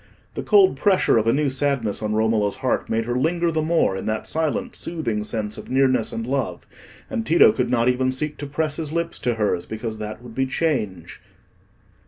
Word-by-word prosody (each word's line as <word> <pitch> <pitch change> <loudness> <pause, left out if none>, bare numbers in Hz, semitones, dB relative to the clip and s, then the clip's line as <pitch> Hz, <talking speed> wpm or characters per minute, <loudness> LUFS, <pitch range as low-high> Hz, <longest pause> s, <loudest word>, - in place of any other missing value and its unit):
The - - -4
cold 395 -2 +4
pressure 190 - +3
of 110 - -1
a - - +5
new 140 +1 +1
sadness 130 -7 0
on 105 0 -1
Romola's 110 -2 +1
heart 130 -1 -1
made 115 0 0
her 120 +1 -2
linger 170 +4 +1
the 160 -1 0
more 160 - +2
in 95 - -5
that 110 0 -2
silent 230 +10 -1
soothing 120 -11 -2
sense 105 -1 -3
of - - -11
nearness 130 -3 +2
and 115 - -4
love; 135 +2 -2 0.4
and 240 -4 -3
Tito 170 -6 +6
could 125 -2 -1
not 120 -1 +2
even 130 +1 +2
seek 150 +3 -3
to 145 - -6
press 150 +1 -2
his 155 -3 -4
lips 170 +1 -2
to 120 -1 0
hers, 105 -5 -1
because 110 0 -5
that 110 +2 -6
would 120 -2 -10
be 130 +2 0
change. 105 - -2
130 Hz, 205 wpm, -22 LUFS, 110-155 Hz, 0.4 s, Tito